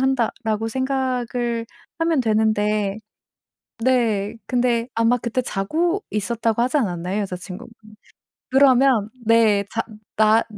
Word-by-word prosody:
한다라고 230 -4 0
생각을 250 -2 -2 0.3
하면 330 -3 +2
되는데 215 -3 +1 0.9
네, 230 -6 +1
근데 240 -1 +1
아마 230 +2 +3
그때 240 +1 -2
자고 325 - -1
있었다고 225 +2 0
하지 255 +4 0
않았나요, 185 -4 -1
여자친구분? 185 +2 -7 0.8
그러면 260 -4 +4 0.2
네 220 -3 +4
자 225 - 0 0.4
나 220 +1 +5
230 Hz, 240 characters per minute, -22 LUFS, 210-255 Hz, 0.9 s, 나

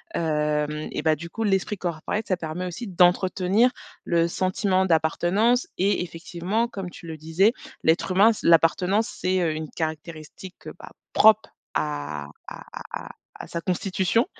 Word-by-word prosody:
Hem, 150 -1 -1
et - - -3
bah 155 -1 +3
du 170 +2 -8
coup 225 +6 -4
l'esprit 200 0 0
corporate 180 +5 -3
ça 185 - +1
permet 165 +2 -4
aussi 200 +6 -6
d'entretenir 185 +5 +3 0.3
le 170 -1 +2
sentiment 185 +2 +1
d'appartenance 175 +9 +2
et 195 +1 +2
effectivement 180 +6 -2
comme 195 -6 -6
tu 170 - -13
le 160 -1 -6
disais: 165 +8 +2 0.3
«L'être 165 +3 +2
humain, 205 +5 +5
c - - -4
l'appartenance 180 +6 +4
c'est, 185 0 +1
heu, 165 -2 +1
une 155 0 -5
caractéristique, 160 +3 -7
heu, - - -6
bah, - - -10 0.2
propre 220 0 +5 0.3
à 75 0 -2 0.2
à - - -8 0.3
à - - -5
à - - -9 0.3
à - - -9
sa 170 - -4
constitution». 190 +4 +1
180 Hz, 160 wpm, -24 LUFS, 160-195 Hz, 0.3 s, humain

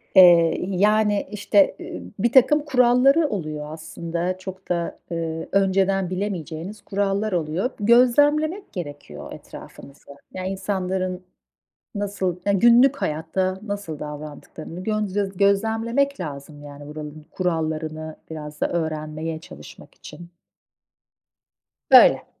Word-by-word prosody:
Eee, 170 -3 +7
y 185 0 -3
yani 210 0 +2
işte, 205 -1 +2
eee, 90 - -7 0.2
birtakım 260 +7 +4
kuralları 265 +3 +4
oluyor 155 -7 -4
aslında. 170 +3 -4
Çok 190 0 -10
da, 170 -1 -2
eee, 165 -1 -4
önceden 195 -1 +2
bilemeyeceğiniz 185 0 -5
kurallar 200 +2 -1
oluyor. 175 +5 -1
Gözlemlemek 290 - +3
gerekiyor 145 - -8
etrafımızı. 140 0 -12 0.3
Yani 185 0 -4
insanların 185 -1 -3 0.7
nasıl 200 -3 -2
ya 200 - +2
günlük 240 +7 +5
hayatta 185 - -2
nasıl 200 -7 -5
davrandıklarını 150 +3 -8
gön 215 0 -1
göz 195 -2 -2
gözlemlemek 225 +7 +1
lazım, 145 -2 -7
yani 145 0 -11
buranın 150 0 -9
kurallarını 155 -3 -3
biraz 150 -2 -8
da - - +1
öğrenmeye 155 -1 -3
çalışmak 75 - -13
için. 170 0 -12 1.6
Böyle. - - +7
185 Hz, 105 wpm, -23 LUFS, 160-205 Hz, 1.6 s, Eee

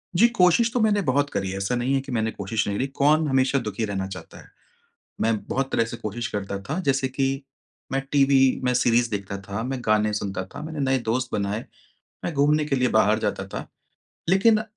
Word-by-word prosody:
जी, 220 +7 +6
कोशिश 230 +1 +3
तो 245 - +1
मैंने 210 -2 +3
बहुत 145 -3 +1
करी 95 -1 -2
है, 95 - -4
ऐसा 100 +5 -1
नहीं 125 +3 0
है 135 - +3
कि 135 0 -9
मैंने 110 -2 0
कोशिश 105 +2 -2
नहीं 100 - -1
करी, 135 - 0
कौन 150 +3 +2
हमेशा 135 0 +2
दुखी 110 -1 -3
रहना 95 -2 -3
चाहता 95 -1 -10
है। - - -18 0.7
मैं 115 -1 +2
बहुत 135 0 -2
तरह 115 - +3
से 115 +1 -6
कोशिश 115 +2 -4
करता 100 -1 -3
था, 155 - -3
जैसे 135 -4 +1
कि 135 +1 -1 0.5
मैं 135 - +1
टीवी 135 -2 +4
मैं 125 0 +2
सीरीज़ 120 -1 +3
देखता 100 -1 -4
था, 100 +3 -5
मैं 130 0 -3
गाने 105 0 +2
सुनता 100 -2 -3
था, - - -6
मैंने 155 -2 -5
नए 135 -1 +2
दोस्त 125 +3 0
बनाए, 100 +2 -2 0.6
मैं - - -1
घूमने 150 +2 +3
के 145 -2 0
लिए 125 -1 +2
बाहर 110 0 +4
जाता - - -2
था। - - -6 0.6
लेकिन 215 +4 +4
130 Hz, 210 wpm, -24 LUFS, 105-140 Hz, 0.7 s, जी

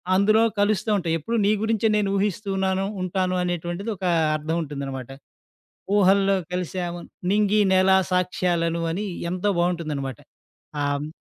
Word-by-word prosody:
అందులో 215 +3 +4 0.2
కలుస్తా 205 0 +1
ఉంటాయి. 165 -3 -1
ఎప్పుడూ 230 +10 -3
నీ 210 - +4
గురించే 225 0 +1
నేను 200 -2 +1
ఊహిస్తూ 205 +1 -1
ఉన్నాను 190 0 0 0.2
ఉంటాను 185 0 -1
అనేటువంటిది 175 +4 -3
ఒక 185 - -5 0.3
అర్థం 155 +2 -2
ఉంటుందన్నమాట. 135 -3 -6 0.9
"ఊహల్లో 195 0 +4 0.2
కలిసాము, 175 -1 -3 0.3
నింగి 210 0 +3
నేల 185 0 +4 0.2
సాక్ష్యాలను" 175 -2 0
అని 205 +5 -3 0.3
ఎంతో 185 +3 0
బాగుంటుందన్నమాట. 155 -8 -2 0.6
ఆహ్ 145 +1 -1
185 Hz, 125 wpm, -24 LUFS, 165-200 Hz, 0.9 s, అందులో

